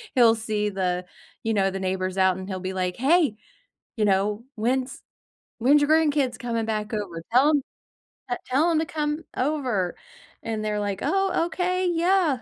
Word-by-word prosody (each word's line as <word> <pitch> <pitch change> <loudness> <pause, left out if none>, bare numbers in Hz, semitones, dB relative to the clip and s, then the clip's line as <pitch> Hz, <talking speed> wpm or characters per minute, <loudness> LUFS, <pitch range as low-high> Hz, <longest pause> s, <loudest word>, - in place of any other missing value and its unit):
he'll 235 -3 +6
see 215 -2 -1
the 180 -2 -1 0.4
you 225 - 0
know, 195 -2 +2
the 195 - -4
neighbors 185 0 -2
out, 190 -1 +3
and 190 0 -7
he'll 190 -1 -3
be 185 +1 -4
like, 180 -1 -2
"Hey, 290 -2 +3 0.6
you 220 - 0
know, 205 +2 +1
when's 255 +4 -1 0.6
when's 275 +6 +5
your 290 - +2
grandkids 295 -5 +3
coming 235 -3 -2
back 215 -1 -3
over? 195 -6 -4
Tell 265 +5 +5
'em 290 -2 +2 0.7
that 245 - -2
te - - -20
tell 295 +7 +3
'em 330 - +2
to 320 - 0
come 300 0 -2
over." 255 - -1 0.5
And 220 -1 -3
they're 210 -1 -1
like, 200 -2 -2
"Oh, 385 -3 +1
okay, 365 +2 0
yeah." 340 -5 +2
230 Hz, 180 wpm, -25 LUFS, 195-295 Hz, 0.7 s, he'll